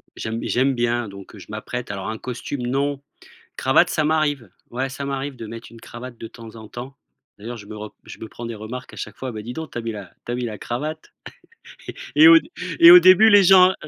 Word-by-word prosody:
j'aime 110 +1 -4
b - - -7
j'aime 130 +2 +1
bien. 120 -1 -1
Donc 100 +1 -12
heu, - - -12
je - - -13
m'apprête, 110 +1 -6
alors 100 +1 -5
un 110 - -4
costume 125 0 -5
non, 140 +2 -1 0.6
cravate, - - +3
ça 155 - 0
m'arrive. 145 - 0 0.2
Ouais 130 +3 -3
ça 140 +1 -6
m'arrive 135 0 -4
de 115 - -8
mettre 115 +1 -9
une 115 - -14
cravate 120 0 -10
de 115 - -7
temps 115 -1 -12
en 110 -1 -11
temps. 130 +3 -9 0.4
D'ailleurs 115 +3 -7
je 100 - -12
me 105 - -9
re 105 0 -9
je - - -11
me 110 - -8
prends 120 - -9
des 115 - -5
remarques 115 +4 -8
à - - -14
chaque - - -7
fois: 130 -1 -5
«Bah 105 -1 -7
dis 120 +3 -7
donc 160 -1 -7
tu - - -5
as - - -2
mis 115 -1 -4
la 100 -4 -9 0.2
tu 120 - -3
as - - -1
mis 125 0 -3
la 110 -2 -6
cravate» 155 +6 -5 1.0
et 310 - +6
et - - +10
au 325 0 +9
dé 315 - -17 0.3
et 335 +1 +10
au 360 - +11
début 200 - +7
les 205 -1 +7
gens, 185 0 +7
heu - - -9
120 Hz, 260 wpm, -22 LUFS, 110-145 Hz, 1.0 s, au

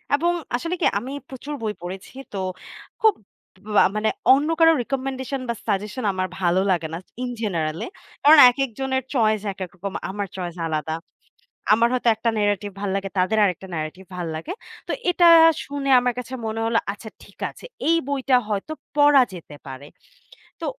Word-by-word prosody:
এবং 340 +4 +1 0.2
আসলে 335 +8 -2
কি - - +3
আমি 250 +5 -7 0.2
প্রচুর 275 +3 -7
বই 215 -2 -2
পড়েছি। 185 +2 -8 0.2
তো 200 - -4 0.6
খুব 440 -1 +6 0.6
বা - - +7
মানে 215 +1 +1 0.2
অন্য 285 +4 +2
কারো 325 0 +7
রিকমেন্ডেশন 265 +1 -3
বা 235 - +1
সাজেশন 210 +4 -2
আমার 185 0 -1
ভালো 180 0 +2
লাগে 165 -3 0
না, - - -2 0.2
ইন 250 - -2
জেনারেল 165 -7 -2
এ, - - -7 0.4
কারণ 305 +2 +8
একেক 270 +2 -1
জনের 265 -1 -1
চয়েস 220 -5 +2
একেক 185 -1 -6
রকম। 190 +1 -6 0.2
আমার 205 +1 -3
চয়েস 175 -3 -5
আলাদা। 160 0 -2 0.8
আমার 230 +2 +4
হয়তো 245 -2 +2
একটা 230 +1 -1
ন্যারেটিভ 205 -1 0
ভালো 200 -1 -2
লাগে 195 0 -4
তাদের 185 +4 +2
আরেকটা 190 0 -2
ন্যারেটিভ 155 +4 -5
ভাল 175 - -3
লাগে। 160 - -6 0.4
তো - - -2 0.2
এটা 350 0 +3 0.4
শুনে 280 -1 -4
আমার 245 0 0
কাছে 250 +1 -8
মনে 220 0 -3
হলো 230 0 +1
আচ্ছা 215 +2 -10
ঠিক - - -18
আছে। - - -14 0.2
এই 330 - +4
বইটা 270 -2 +1
হয়তো 210 +9 -2 0.2
পড়া 290 -2 +6
যেতে 165 -4 -10
পারে। 135 +2 -8 0.7
তো - - -4
220 Hz, 175 wpm, -23 LUFS, 185-265 Hz, 0.8 s, কারণ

